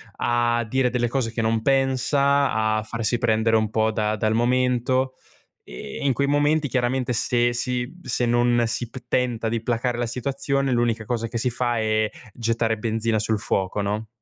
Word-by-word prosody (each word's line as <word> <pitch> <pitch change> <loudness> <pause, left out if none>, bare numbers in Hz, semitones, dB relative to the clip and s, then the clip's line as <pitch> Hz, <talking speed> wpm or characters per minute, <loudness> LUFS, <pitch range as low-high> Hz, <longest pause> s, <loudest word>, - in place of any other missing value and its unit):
a 120 -1 +1
dire 130 +2 +1
delle 120 -1 0
cose 115 -2 -1
che 115 -1 -2
non 110 0 +1
pensa, 140 +2 +2
a 110 0 +1
farsi 115 +2 -2
prendere 115 -1 +2
un 110 -1 0
po' 110 0 +1
da 105 -1 0
dal 110 0 0
momento, 125 +2 +1 0.5
e 65 +2 -8
e - - -3
in 135 - +3
quei 140 +3 0
momenti 145 +1 +2
chiaramente 125 -1 0
se 120 +1 +1
si 125 0 -1
mhmm, 175 +8 -15
se 125 -3 -1
non 120 0 +3
si 115 +1 -3
p - - -10
tenta 120 -3 0
di 115 -1 -2
placar 120 +1 -1
la 120 - 0
situazione 135 +2 -1
l'unica 120 -2 0
cosa 115 -1 -2
che 115 - -4
si 125 +2 0
fa 120 0 -1
è 110 -1 +1 0.2
gettare 115 -1 0
benzina 110 0 0
sul 110 0 0
fuoco, 95 0 -1
no? 105 +2 -2
120 Hz, 185 wpm, -23 LUFS, 110-125 Hz, 0.5 s, in